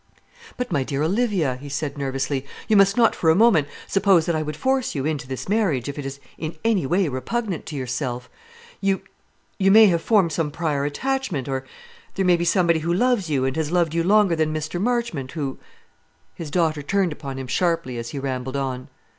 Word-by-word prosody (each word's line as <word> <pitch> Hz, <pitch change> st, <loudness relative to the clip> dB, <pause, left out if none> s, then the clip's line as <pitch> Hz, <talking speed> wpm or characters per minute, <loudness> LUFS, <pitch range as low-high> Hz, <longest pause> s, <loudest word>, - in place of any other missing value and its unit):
"But, 250 Hz, -3 st, -3 dB
my 145 Hz, -5 st, +1 dB
dear 140 Hz, +2 st, -2 dB
Olivia," 185 Hz, -, +1 dB
he 140 Hz, +2 st, -9 dB
said 145 Hz, 0 st, -3 dB
nervously, 135 Hz, -1 st, -2 dB, 0.2 s
"you 220 Hz, -, +3 dB
must 200 Hz, +1 st, +5 dB
not 230 Hz, -2 st, +4 dB
for 160 Hz, -, +1 dB
a 160 Hz, -, +5 dB
moment 195 Hz, -8 st, +4 dB, 0.2 s
suppose 195 Hz, -4 st, +3 dB
that 170 Hz, -2 st, 0 dB
I 155 Hz, -, 0 dB
would 150 Hz, -1 st, -4 dB
force 265 Hz, -2 st, 0 dB
you 135 Hz, -1 st, -2 dB
into 150 Hz, -3 st, -2 dB
this 130 Hz, -1 st, -5 dB
marriage, 185 Hz, -, +1 dB
if 140 Hz, +1 st, -5 dB
it 140 Hz, -, -4 dB
is 135 Hz, +1 st, -7 dB, 0.2 s
in 160 Hz, +1 st, -4 dB
any 205 Hz, -11 st, +2 dB
way 180 Hz, +4 st, +2 dB
repugnant 180 Hz, -, -3 dB
to 155 Hz, -, -6 dB
yourself. 125 Hz, -1 st, -3 dB, 0.5 s
You 195 Hz, -1 st, 0 dB, 0.6 s
you 195 Hz, 0 st, +4 dB
may 220 Hz, +3 st, +8 dB
have 170 Hz, -5 st, +3 dB
formed 195 Hz, -6 st, +3 dB
some 155 Hz, -1 st, -1 dB
prior 145 Hz, -2 st, -1 dB
attachment 215 Hz, -, -2 dB
or, 135 Hz, -1 st, -3 dB, 0.5 s
there 195 Hz, -, 0 dB
may 180 Hz, -1 st, +5 dB
be 170 Hz, 0 st, -1 dB
somebody 170 Hz, -3 st, +3 dB
who 165 Hz, +2 st, -2 dB
loves 210 Hz, -1 st, +1 dB
you, 135 Hz, -3 st, +1 dB
and 135 Hz, +1 st, -1 dB
has 160 Hz, -1 st, -1 dB
loved 170 Hz, -3 st, +1 dB
you 165 Hz, 0 st, +1 dB
longer 200 Hz, -1 st, +4 dB
than 155 Hz, -1 st, 0 dB
Mr. 155 Hz, +3 st, -3 dB
Marchmont, 230 Hz, -, -1 dB
who 140 Hz, -5 st, -4 dB, 0.4 s
" 80 Hz, 0 st, -40 dB
His 165 Hz, -4 st, -7 dB
daughter 160 Hz, -2 st, +1 dB
turned 190 Hz, +4 st, 0 dB
upon 140 Hz, -3 st, -6 dB
him 135 Hz, -, -5 dB
sharply 165 Hz, -4 st, -1 dB
as 115 Hz, 0 st, -5 dB
he 140 Hz, -, -6 dB
rambled 130 Hz, -1 st, -3 dB
on. 130 Hz, -2 st, -3 dB
160 Hz, 210 wpm, -23 LUFS, 140-195 Hz, 0.6 s, may